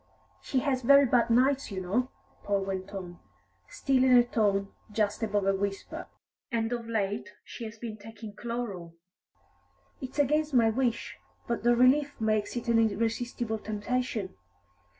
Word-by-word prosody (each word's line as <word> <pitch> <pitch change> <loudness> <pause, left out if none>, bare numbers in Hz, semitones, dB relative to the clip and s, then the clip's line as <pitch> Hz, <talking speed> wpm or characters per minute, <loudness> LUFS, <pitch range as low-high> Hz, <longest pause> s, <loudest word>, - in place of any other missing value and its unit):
"She 260 - 0
has 265 -2 0
very 280 +3 +7
bad 240 -1 +3
nights, 260 +4 +3
you 195 -3 -4
know," 215 +8 0 0.3
Paul 200 -1 0
went 190 0 -4
on, 180 -3 -7 0.5
still 265 -2 +1
in 255 -1 +6
a 240 - +7
tone 200 -4 +1 0.2
just 210 0 0
above 210 -3 0
a 195 - +3
whisper, 195 0 -4 0.4
"and 230 0 0
of 235 -1 -4
late 210 -1 -2
she 235 - -8
has 220 +1 -8
been 220 -1 -6
taking 220 0 -10
chloral. 205 -8 -5 1.1
It's 260 +1 -7
against 300 +1 +2
my 230 -2 +5
wish, 240 -1 -1 0.3
but 235 - -1
the 240 +1 +4
relief 275 +4 +3
makes 215 -1 0
it 240 - -4
an 230 -1 +4
irresistible 225 +1 -1
temptation. 215 -1 -2
230 Hz, 150 wpm, -29 LUFS, 205-250 Hz, 1.1 s, very